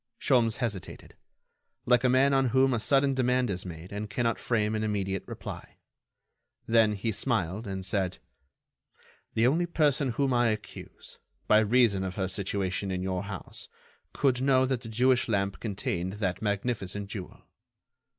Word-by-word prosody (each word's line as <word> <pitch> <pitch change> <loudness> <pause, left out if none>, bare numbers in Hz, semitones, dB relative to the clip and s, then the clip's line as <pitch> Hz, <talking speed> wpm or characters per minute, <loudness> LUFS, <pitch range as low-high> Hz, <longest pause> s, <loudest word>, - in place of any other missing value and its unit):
Sholmes 120 -5 +3
hesitated, 105 -8 -5 0.7
like 125 0 +4
a 130 - +4
man 135 +2 +4
on 135 -1 +3
whom 130 +2 +3
a 120 - 0
sudden 135 +3 +2
demand 125 -2 +1
is 90 0 -4
made 85 +1 -9
and 105 +1 -5
cannot 115 0 -1
frame 110 -3 0
an 110 0 -1
immediate 95 -3 -1
reply. - - -8 0.9
Then 115 -2 +4
he 105 +3 -2
smiled, 105 -2 -1
and 95 -1 -4
said: 95 -2 0 1.2
"Only 135 +10 +3
the 175 - -15
person 145 -4 +2
whom 135 +1 +1
I 120 -1 +3
accuse, 110 -1 -6 0.3
by 105 - +6
reason 110 -3 +3
of 95 -1 -4
her 95 -2 -1
situation 95 0 -2
in 90 -1 -2
your 95 +1 -2
house, 100 -3 -8 0.4
could 130 -3 +1
know 130 -1 +4
that 130 -2 -1
the 115 - -8
Jewish 125 +3 +2
lamp 100 -2 0
contained 95 -4 -3
that 100 -3 -2
magnificent 100 -2 -2
jewel." 100 -2 -8
110 Hz, 155 wpm, -28 LUFS, 95-125 Hz, 1.2 s, by